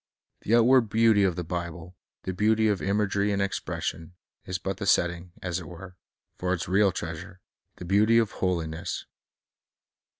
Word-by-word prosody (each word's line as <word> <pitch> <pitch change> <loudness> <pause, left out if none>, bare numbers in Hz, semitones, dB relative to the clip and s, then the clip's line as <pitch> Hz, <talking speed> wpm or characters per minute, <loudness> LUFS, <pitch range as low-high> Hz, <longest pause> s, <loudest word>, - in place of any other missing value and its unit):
The 115 - +2
outward 120 0 +5
beauty 110 -1 +4
of 95 -3 +2
the 90 - -3
Bible, 85 +1 -6 0.3
the 95 - -3
beauty 110 +3 +2
of 105 -3 0
imagery 100 0 +1
and 100 - 0
expression, 90 -3 -3 0.3
is 90 - -3
but 95 0 -4
the 100 - -4
set 85 - +4
ting, 85 +1 -11
as 90 -1 -2
it 85 - -9
were, 90 +3 -10 0.4
for 90 0 0
its 85 - -5
real 100 +1 +3
treasure, 85 +2 -7 0.2
— - - -53
the - - -8
beauty 105 +5 +4
of 115 -3 +2
holiness. 85 -2 -3
95 Hz, 170 wpm, -27 LUFS, 85-105 Hz, 0.4 s, outward